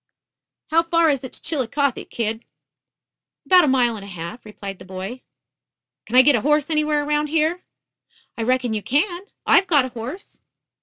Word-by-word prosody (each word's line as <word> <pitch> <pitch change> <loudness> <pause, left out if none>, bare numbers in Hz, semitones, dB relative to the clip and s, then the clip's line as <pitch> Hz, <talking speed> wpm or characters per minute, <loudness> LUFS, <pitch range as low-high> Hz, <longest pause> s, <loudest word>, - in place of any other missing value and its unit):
"How 330 +1 +5
far 335 -1 +2
is 275 -2 -2
it 260 - -7
to - - -8
Chillicothe, 280 -2 -1
kid?" 225 0 -3 1.0
"About 365 -1 +6
a - - 0
mile 250 -3 +2
and 205 - -8
a - - -10
half," 175 +4 -8
replied 200 -2 -8
the - - -11
boy. 190 +7 -7 0.9
"Can 235 - -4
I 255 - +9
get 290 +2 +6
a 230 - 0
horse 300 +3 +1
anywhere 300 -1 +1
around 300 0 0
here?" 320 +3 0 0.7
"I - - -5
reckon 250 0 0
you 215 - -2
can. 345 - -1 0.2
I've 385 - +5
got 290 -7 +4
a - - -5
horse." 250 - -8
265 Hz, 175 wpm, -21 LUFS, 225-305 Hz, 1.0 s, I